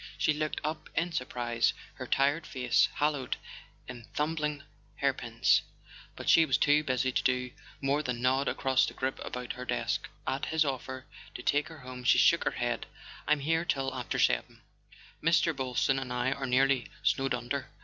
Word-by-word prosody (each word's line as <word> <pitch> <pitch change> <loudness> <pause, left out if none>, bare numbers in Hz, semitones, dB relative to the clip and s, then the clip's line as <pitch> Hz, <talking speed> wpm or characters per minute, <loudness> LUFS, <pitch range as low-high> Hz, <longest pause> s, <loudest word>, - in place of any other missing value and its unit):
She 155 - +2
looked 155 0 -2
up 155 +1 -4
in 170 +2 0
surprise, 120 -6 0 0.2
her - - -7
tired 145 +4 +2
face 125 -3 +2
haloed 145 -3 0 0.5
in 120 -3 -9
tumbling 150 -1 -1 0.3
hairpins; - - +2 0.5
but - - -8
she 165 - +7
was 135 -5 +2
too 150 +1 +4
busy 130 -2 0
to - - +1
do 125 -1 0 0.3
more 140 +2 +1
than 125 -5 -3
nod 130 +3 +2
across 130 -1 +2
the - - -7
group 130 0 -2
about 125 -1 -5
her 125 - -7
desk. - - -2 0.2
At 135 - -1
his 160 0 +2
offer 130 -1 -4 0.3
to 125 - -6
take 145 +3 +2
her 160 -3 -11
home 125 0 -8
she 125 - +5
shook 170 - +5
her 140 - -1
head. 120 -1 -2 0.4
"I'm 150 -1 +3
here 165 +3 +1
till 135 -6 -1
after 125 -2 -3
seven. - - +1 0.6
Mr. 165 0 +3
Boylston 135 0 +1
and 130 -2 -6
I 125 +1 0
are 135 0 -3
nearly 130 0 +3 0.2
snowed 135 -2 +2
under. 125 +3 -4
135 Hz, 175 wpm, -30 LUFS, 125-150 Hz, 0.6 s, she